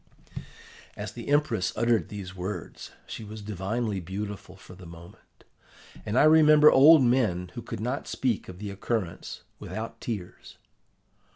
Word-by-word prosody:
"As -, -, -5 dB
the -, -, -9 dB
Empress 145 Hz, -10 st, +1 dB
uttered 115 Hz, -2 st, +1 dB
these 95 Hz, -3 st, -8 dB
words 95 Hz, +3 st, -6 dB, 0.2 s
she -, -, -8 dB
was 105 Hz, 0 st, -9 dB
divinely 105 Hz, +1 st, -3 dB
beautiful 95 Hz, +1 st, -7 dB
for 95 Hz, -1 st, -14 dB
the 90 Hz, -1 st, -12 dB
moment, 85 Hz, +3 st, -15 dB, 0.6 s
and 105 Hz, +4 st, -1 dB
I -, -, +6 dB
remember 155 Hz, -1 st, +7 dB
old 145 Hz, +2 st, +7 dB
men 110 Hz, -8 st, +1 dB
who -, -, -6 dB
could -, -, -7 dB
not 125 Hz, +5 st, -3 dB
speak 120 Hz, -8 st, -2 dB
of 90 Hz, -, -9 dB
the 100 Hz, +1 st, -6 dB
occurrence 100 Hz, -3 st, -4 dB, 0.2 s
without 115 Hz, +1 st, -7 dB
tears. 105 Hz, -7 st, -7 dB
105 Hz, 145 wpm, -27 LUFS, 95-125 Hz, 0.6 s, remember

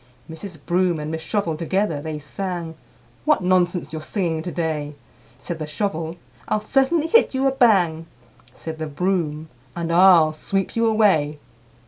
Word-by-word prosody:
IV. 160 Hz, -, -8 dB
Mrs. 195 Hz, -5 st, -8 dB
Broom 175 Hz, -2 st, +1 dB
and 150 Hz, +1 st, -4 dB
Miss 160 Hz, 0 st, -4 dB
Shovel 170 Hz, -1 st, -1 dB
together 170 Hz, -1 st, -1 dB
they 155 Hz, 0 st, -4 dB
sang, 170 Hz, +2 st, -5 dB, 0.5 s
"What 300 Hz, -10 st, +2 dB
nonsense 180 Hz, -2 st, +1 dB
you're 155 Hz, -, -4 dB
singing 165 Hz, -2 st, -2 dB
to 175 Hz, +2 st, -5 dB
day!" 155 Hz, -4 st, -3 dB, 0.4 s
Said 165 Hz, +5 st, -6 dB
the 155 Hz, -, -4 dB
Shovel, 160 Hz, 0 st, -3 dB, 0.3 s
"I'll 215 Hz, -, 0 dB
certainly 275 Hz, +7 st, +2 dB
hit 330 Hz, -, +4 dB
you 265 Hz, +1 st, +1 dB
a 270 Hz, -, +4 dB
bang!" 180 Hz, -11 st, +3 dB, 0.4 s
Said 155 Hz, +6 st, -8 dB
the 155 Hz, -, -3 dB
Broom, 160 Hz, -1 st, -2 dB, 0.3 s
"And 170 Hz, -1 st, -3 dB
I'll 170 Hz, -3 st, +6 dB
sweep 195 Hz, +4 st, -2 dB
you 230 Hz, 0 st, +2 dB
away!" 190 Hz, -10 st, +3 dB
170 Hz, 160 wpm, -22 LUFS, 155-195 Hz, 0.5 s, I'll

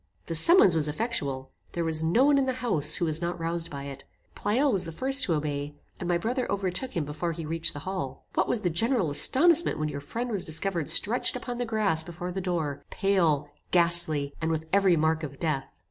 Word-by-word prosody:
This 165 Hz, -2 st, +6 dB
summons 335 Hz, -, +6 dB
was 155 Hz, -2 st, +1 dB
effectual. 145 Hz, -, -3 dB, 0.2 s
There 170 Hz, -, -2 dB
was 160 Hz, -1 st, -1 dB
no 170 Hz, +11 st, +3 dB
one 285 Hz, -1 st, +4 dB
in 265 Hz, -, 0 dB
the 260 Hz, -, 0 dB
house 240 Hz, -, 0 dB
who 180 Hz, -, -1 dB
was 160 Hz, 0 st, +1 dB
not 175 Hz, 0 st, -3 dB
roused 165 Hz, 0 st, -3 dB
by 140 Hz, -1 st, -7 dB
it. 140 Hz, -1 st, -8 dB, 0.3 s
Pleyel 260 Hz, +7 st, 0 dB
was 190 Hz, -4 st, +1 dB
the 165 Hz, -, -5 dB
first 270 Hz, -, +4 dB
to 165 Hz, -, 0 dB
obey, 145 Hz, -1 st, -4 dB, 0.2 s
and 175 Hz, -, -4 dB
my 175 Hz, -, +2 dB
brother 245 Hz, +7 st, -2 dB
overtook 195 Hz, +3 st, -2 dB
him 160 Hz, -, -1 dB
before 155 Hz, +4 st, -4 dB
he 165 Hz, 0 st, -7 dB
reached 165 Hz, +1 st, -1 dB
the 145 Hz, -, -8 dB
hall. 185 Hz, -9 st, -5 dB
What -, -, +1 dB
was 225 Hz, -, -1 dB
the 180 Hz, -4 st, -1 dB
general 225 Hz, -, +1 dB
astonishment 320 Hz, -, +5 dB
when 155 Hz, -1 st, -2 dB
your 140 Hz, -1 st, -6 dB
friend 235 Hz, +12 st, -5 dB
was 200 Hz, -4 st, 0 dB
discovered 165 Hz, 0 st, -2 dB
stretched 235 Hz, +5 st, +2 dB
upon 245 Hz, -1 st, -5 dB
the 245 Hz, -, -1 dB
grass 205 Hz, -8 st, +1 dB
before 175 Hz, +2 st, -7 dB
the 190 Hz, +2 st, -4 dB
door, 155 Hz, -6 st, -3 dB
pale, 165 Hz, -8 st, 0 dB, 0.2 s
ghastly, 170 Hz, -5 st, 0 dB
and 160 Hz, -, -1 dB
with 160 Hz, -1 st, -2 dB
every 195 Hz, -3 st, +4 dB
mark 160 Hz, +1 st, +1 dB
of 140 Hz, -3 st, -8 dB
death! 150 Hz, -5 st, -2 dB
170 Hz, 220 wpm, -27 LUFS, 155-205 Hz, 0.3 s, This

